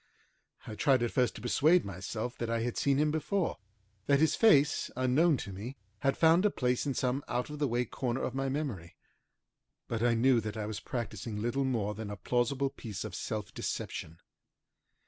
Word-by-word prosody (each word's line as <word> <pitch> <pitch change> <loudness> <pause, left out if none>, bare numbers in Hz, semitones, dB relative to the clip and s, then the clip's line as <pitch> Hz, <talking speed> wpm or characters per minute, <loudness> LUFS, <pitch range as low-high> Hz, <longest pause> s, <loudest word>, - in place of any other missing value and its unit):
I 110 - -6
tried 130 +2 +3
at 120 - 0
first 125 -2 +1
to 110 - -9
persuade 155 +8 +4
myself 100 +5 -4
that 120 - -2
I 115 0 0
had 120 0 -2
seen 140 -1 +2
him 150 +1 +2
before, 160 +4 -1 0.5
that 140 -1 +4
his 160 +1 +3
face, 150 -11 +4
unknown 135 +5 +3
to 100 - -6
me, 115 +8 -7 0.2
had 135 +3 +1
found 165 +3 +5
a 210 - +5
place 125 -5 0
in 135 - -1
some 130 +2 0
out 125 +4 -2
of 150 - -7
the 145 - +2
way 120 0 0
corner 125 +2 -2
of 125 - -2
my 135 0 -1
memory, 130 - -4 0.9
but 115 -1 -2
I 120 -1 +3
knew 120 +1 +4
that 110 0 -5
I 105 - -2
was 105 0 -4
practicing 115 -4 -4
little 120 +5 0
more 110 -5 0
than 105 0 -6
a 105 - -5
plausible 130 +6 0
piece 105 -4 -6
of 110 -4 -6
self 105 +3 -4
deception. 80 +1 -4
125 Hz, 195 wpm, -31 LUFS, 110-140 Hz, 0.9 s, found